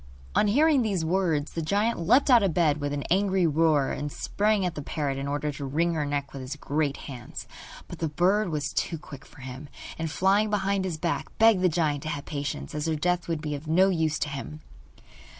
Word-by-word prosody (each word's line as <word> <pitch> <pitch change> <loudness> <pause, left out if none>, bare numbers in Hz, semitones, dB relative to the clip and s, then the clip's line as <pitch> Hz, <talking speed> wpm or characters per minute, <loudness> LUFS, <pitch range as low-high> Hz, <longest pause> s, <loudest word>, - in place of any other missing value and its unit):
On 210 - +3
hearing 290 +5 +4
these 195 -8 0
words 165 -4 0
the 165 - -2
giant 205 +7 0
leapt 245 - +4
out 240 -2 +7
of 195 -5 0
bed 155 -4 +3
with 145 0 -2
an 145 -1 -2
angry 190 -1 +3
roar, 155 -3 +3
and 145 0 -4
sprang 205 +3 0
at 180 - -1
the 150 - -5
parrot 140 -2 -2
in 140 - -3
order 145 +1 -1
to 140 0 -7
wring 165 +5 0
her 150 -3 -1
neck 145 -1 -3
with 135 - -6
his 130 +3 -5
great 145 -1 -1
hands. 125 -4 -8 0.4
But - - -9
the 160 - -1
bird 185 +6 +2
was 150 -3 -2
too 165 - -1
quick 140 -2 -12
for - - -16
him, 130 +3 -8 0.3
and, 160 0 -2
flying 195 +6 +2
behind 200 -2 0
his 175 -4 -3
back, 170 +1 -2
begged 225 -4 +5
the 185 - +4
giant 155 -4 0
to 155 - -5
have 145 -2 -4
patience, 145 -2 -4
as 150 +1 -2
her 160 - +1
death 175 +3 0
would 165 -2 -2
be 150 -1 -3
of 145 +2 -6
no 185 +5 +4
use 160 -4 +1
to 145 - -2
him. 145 +2 -7
160 Hz, 225 wpm, -27 LUFS, 145-190 Hz, 0.4 s, out